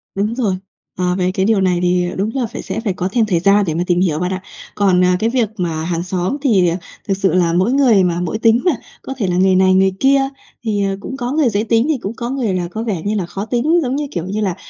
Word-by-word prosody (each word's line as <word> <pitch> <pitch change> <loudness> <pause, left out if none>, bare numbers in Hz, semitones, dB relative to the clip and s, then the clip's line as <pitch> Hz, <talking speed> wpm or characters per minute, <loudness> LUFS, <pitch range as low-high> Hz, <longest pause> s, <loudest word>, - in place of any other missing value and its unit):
Đúng 210 +4 -1
rồi. 220 -7 0 0.4
Ờ, 180 0 0
về 185 0 0
cái 190 0 0
điều 215 -2 +2
này 180 -2 +2
thì 180 0 +2
đúng 200 +3 0
là 260 -3 0
phải 230 - -7
sẽ - - -4
phải 220 -4 -2
có 180 +1 -2
thêm 230 0 +2
thời 185 -5 +1
gian 200 +3 +4
để 160 - 0
mà 170 +2 -1
tìm 175 -1 +2
hiểu 160 -5 +1
bạn 180 +2 -1
ạ. 185 - -4 0.3
Còn, 190 -3 +3
à, 180 0 +3
cái 225 - +1
việc 235 -3 +1
mà 165 -4 -2
hàng 170 0 -2
xóm 185 +8 -2
thì 195 - +3 0.4
thực 195 -2 0
sự 195 0 +1
là 175 -2 +2
mỗi 190 +8 +2
người 245 -8 +4
mà 175 -1 0
mỗi 180 +5 -2
tính 230 +1 +4
mà, 360 - +5 0.3
có 270 - -6
thể 210 -7 -1
là 180 - 0
người 190 0 +4
này 185 0 +4
người 190 0 +4
kia, 275 +1 +4 0.4
thì, 210 -3 0
ờ, 195 0 -2
cũng 265 +6 -7
có 245 -1 -3
người 295 -4 +2
dễ 205 0 0
tính 230 +1 +2
thì 310 - +2
cũng 205 +2 -5
có 240 0 -4
người 250 -7 -1
là 180 -1 -2
có 220 +3 -4
vẻ 205 -8 -2
như 210 +1 0
là 195 -4 -1
khó 195 +4 -5
tính. 255 +9 +1
Giống 255 0 -1
như, 295 0 -2
kiểu 170 -2 -3
như 200 +3 -3
là, 190 -4 -1
195 Hz, 285 wpm, -17 LUFS, 180-230 Hz, 0.4 s, mà